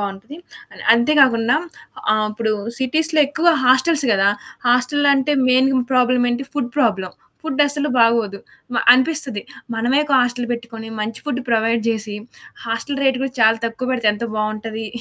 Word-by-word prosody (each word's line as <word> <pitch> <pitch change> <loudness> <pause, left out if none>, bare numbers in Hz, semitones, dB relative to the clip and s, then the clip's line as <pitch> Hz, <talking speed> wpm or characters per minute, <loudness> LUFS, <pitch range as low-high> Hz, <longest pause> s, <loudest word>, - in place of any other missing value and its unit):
బావుంటది. 200 +7 -6 0.6
అంతే 240 +6 +2
గాకుండా 240 -1 +3 0.6
ఆహ్, 215 0 +1
ఇప్పుడు 220 0 -2 0.3
సిటీస్‌లో 310 +4 0
ఎక్కువ 325 +4 0 0.2
హాస్టెల్స్ 270 +3 +3
గదా! 195 0 +3 0.4
హాస్టల్లంటే 280 +3 +2 0.2
మెయిన్ 260 +1 +3 0.2
ప్రాబ్లమ్ 250 -1 +2
ఏంటి, 255 +3 -3
ఫుడ్ 265 -5 -2
ప్రాబ్లమ్. 205 -8 0 0.3
ఫుడ్ 295 -3 -2
అస్సలు 290 +1 -2
బాగోదు. 230 -3 +2 0.4
మ - - -2 0.2
అనిపిస్తది. 260 -4 0 0.3
మనమే 240 +5 +1
ఒక 295 - -5
హాస్టల్ 245 0 -1
పెట్టుకొని 230 -1 -7
మంచి 215 +1 -4
ఫుడ్ 260 -2 -2
ప్రొవైడ్ 225 0 +1
జేసి, 215 -2 -3 0.5
హాస్టల్ 250 +5 -3
రేట్ 265 -2 +2
కూడా 270 - -3
చాలా 220 +1 +5
తక్కువ 230 +3 -5
పెడితే 235 -4 +1
ఎంత 210 +3 -5
బావుంటది. 215 +1 -4
245 Hz, 145 wpm, -19 LUFS, 225-270 Hz, 0.6 s, చాలా